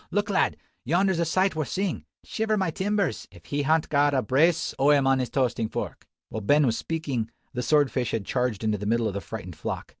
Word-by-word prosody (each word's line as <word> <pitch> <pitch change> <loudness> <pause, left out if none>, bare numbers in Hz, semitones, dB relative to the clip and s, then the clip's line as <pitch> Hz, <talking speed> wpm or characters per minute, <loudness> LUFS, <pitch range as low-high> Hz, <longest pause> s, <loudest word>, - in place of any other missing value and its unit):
"Look, 205 0 0
lad! 190 - +2 0.3
yonder's 175 +5 +2
a 170 - +2
sight 185 +3 +1
worth 155 -2 -1
seein'. 195 -1 -2 0.2
Shiver 220 -1 -1
my 190 -4 0
timbers, 195 - -1
if 85 -3 -17
he 145 +10 -1
han't 155 +2 +2
got 145 -1 +3
a 130 - +2
brace 165 +5 +2
o' 140 +2 +4
'em 145 -2 +5
on 135 0 +3
his 125 - -1
toastin' 120 -4 0
fork!" - - -5 0.2
While 110 - -4
Ben 145 +8 +4
was 115 -3 +1
speaking, 140 -9 -3 0.2
the 125 - -2
sword 145 +1 +3
fish 125 -3 -1
had 110 -3 -2
charged 125 -4 -1
into 105 -2 0
the 105 - -4
middle 115 0 +2
of 100 - -3
the 100 - -3
frightened 95 -5 -7
flock. - - -4
140 Hz, 230 wpm, -26 LUFS, 115-165 Hz, 0.3 s, em